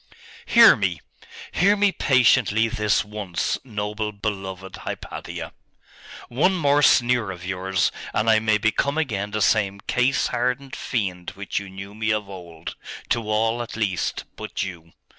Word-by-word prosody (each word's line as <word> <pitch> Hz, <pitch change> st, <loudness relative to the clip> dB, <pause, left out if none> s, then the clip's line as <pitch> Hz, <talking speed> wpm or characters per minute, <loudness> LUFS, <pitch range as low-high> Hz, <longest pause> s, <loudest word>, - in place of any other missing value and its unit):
'Hear 235 Hz, -1 st, +8 dB
me! 95 Hz, -5 st, -1 dB, 0.5 s
hear 200 Hz, +4 st, +4 dB
me 205 Hz, -1 st, +3 dB
patiently 125 Hz, -, +3 dB
this 105 Hz, -3 st, +1 dB
once, 105 Hz, -4 st, -3 dB
noble, 105 Hz, -2 st, -3 dB
beloved 95 Hz, -3 st, -5 dB
Hypatia! -, -, -7 dB, 0.7 s
One 160 Hz, +10 st, +2 dB
more 145 Hz, -4 st, +3 dB
sneer 120 Hz, -5 st, +4 dB
of 90 Hz, -2 st, -7 dB
yours, 95 Hz, 0 st, 0 dB, 0.2 s
and 110 Hz, -, 0 dB
I 110 Hz, -1 st, +5 dB
may 110 Hz, -1 st, +2 dB
become 115 Hz, +7 st, 0 dB
again 105 Hz, -10 st, -1 dB
the 105 Hz, 0 st, 0 dB
same 100 Hz, -2 st, +2 dB
case 125 Hz, +6 st, +1 dB
hardened 125 Hz, +3 st, -2 dB
fiend 95 Hz, -7 st, -3 dB
which 100 Hz, 0 st, -3 dB
you 100 Hz, -1 st, -9 dB
knew 95 Hz, +1 st, -9 dB
me 110 Hz, +1 st, -2 dB
of 105 Hz, -2 st, -1 dB
old 85 Hz, -4 st, -9 dB, 0.3 s
to 115 Hz, -2 st, -1 dB
all, 115 Hz, +2 st, +1 dB
at 120 Hz, -, -6 dB
least, 100 Hz, -5 st, -1 dB
but -, -, -4 dB
you. 85 Hz, -3 st, -8 dB
105 Hz, 145 wpm, -23 LUFS, 95-120 Hz, 0.7 s, Hear